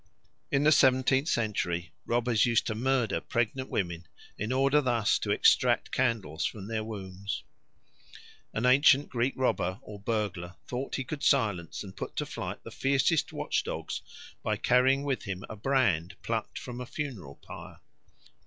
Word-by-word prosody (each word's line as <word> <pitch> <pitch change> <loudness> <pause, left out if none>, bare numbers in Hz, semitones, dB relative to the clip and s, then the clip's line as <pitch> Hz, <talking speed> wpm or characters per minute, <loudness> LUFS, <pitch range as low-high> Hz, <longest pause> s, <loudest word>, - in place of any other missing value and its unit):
In 140 - +2
the 155 - +5
seventeenth 130 0 +4
century 95 - -1 0.2
robbers 120 -2 +2
used 115 -2 +3
to 110 - -1
murder 125 +1 +1
pregnant 120 +3 -1
women 85 -3 -2 0.3
in 110 +4 -3
order 135 +3 +3
thus 120 -6 +2
to - - -4
extract - - +3
candles 110 - 0
from 100 -3 -3
their 110 -1 -2
wombs. 100 -2 -5 1.1
An 115 - -1
ancient 140 +2 +5
Greek 125 +2 0
robber 95 -8 0
or 105 -1 -9
burglar 100 -5 -2
thought 130 - -4
he 135 - -2
could 145 +2 -6
silence 105 - +1
and 95 -2 -10
put - - -6
to - - -1
flight - - -6
the - - -9
fiercest 140 +4 +1
watchdogs - - -2 0.4
by - - -1
carrying 130 +3 +3
with 135 -4 -2
him 95 -1 -5
a - - -7
brand 105 - +1
plucked - - -3
from 125 0 -6
a 125 - -6
funeral 115 - -5
pyre. - - -11
120 Hz, 155 wpm, -29 LUFS, 100-135 Hz, 1.1 s, the